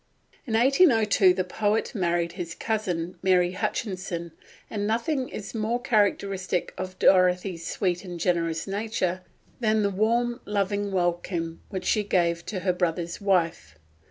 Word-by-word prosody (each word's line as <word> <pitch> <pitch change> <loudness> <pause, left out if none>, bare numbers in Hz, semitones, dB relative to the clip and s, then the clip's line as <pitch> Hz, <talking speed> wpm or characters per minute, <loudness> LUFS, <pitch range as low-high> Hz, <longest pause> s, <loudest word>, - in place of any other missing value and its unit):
In 225 - 0
1802 230 - +5
the 185 - 0
poet 210 +4 -1
married 170 -4 0
his 175 -2 -6
cousin, 180 -6 -2
Mary 180 -2 +3
Hutchinson, 185 -3 -3 0.4
and 205 -1 -3
nothing 255 +4 0
is 200 -2 -7
more 225 +2 -1
characteristic 200 -6 0
of 185 0 -6
Dorothy's 180 -2 +3
sweet 180 -2 -1
and 175 -2 -7
generous 165 -2 0
nature 195 -3 -2 0.4
than 215 -2 +2
the 200 - +1
warm, 235 +5 +1
loving 205 0 -1
welcome 175 -2 -1
which 190 -3 -5
she 215 - +2
gave 170 -4 +1
to 190 -4 -3
her 185 0 +1
brother's 175 0 -2
wife. 175 - 0
190 Hz, 135 wpm, -26 LUFS, 175-215 Hz, 0.4 s, 1802